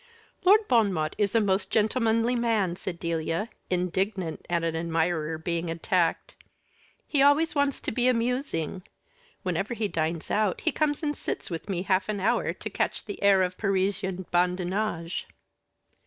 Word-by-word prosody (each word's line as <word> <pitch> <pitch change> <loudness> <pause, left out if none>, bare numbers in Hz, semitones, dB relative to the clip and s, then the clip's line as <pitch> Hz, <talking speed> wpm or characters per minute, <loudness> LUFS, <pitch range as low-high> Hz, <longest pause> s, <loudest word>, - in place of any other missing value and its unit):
"Lord 415 +4 +5
Bon 225 -5 +4
Mot 155 -3 -1
is 205 +2 +1
a - - +6
most 195 -2 +1
gentlemanly 225 +2 +2
man," 220 -7 +1
said 180 -1 -5
Delia, 165 +4 -2 0.2
indignant 180 0 -1
at 170 -1 +1
an 165 -1 -1
admirer 165 -1 0
being 170 +1 -2
attacked. 165 +1 0 0.7
"He 285 - +1
always 290 +4 +4
wants 285 -2 +1
to - - -3
be 245 +2 +1
amusing. 235 - 0 0.6
Whenever 190 +5 -1
he 220 -2 0
dines 165 -2 -2
out, 210 -3 +1
he 320 - +1
comes 300 0 0
and 295 -1 0
sits - - -5
with 165 +4 -5
me 180 -2 -1
half 190 0 +1
an 210 -1 -1
hour 195 - +1
to - - -6
catch - - -2
the 205 - -7
air 200 -2 +5
of 185 0 -3
Parisian 190 -2 0
badinage." 180 0 0
190 Hz, 155 wpm, -27 LUFS, 170-225 Hz, 0.7 s, a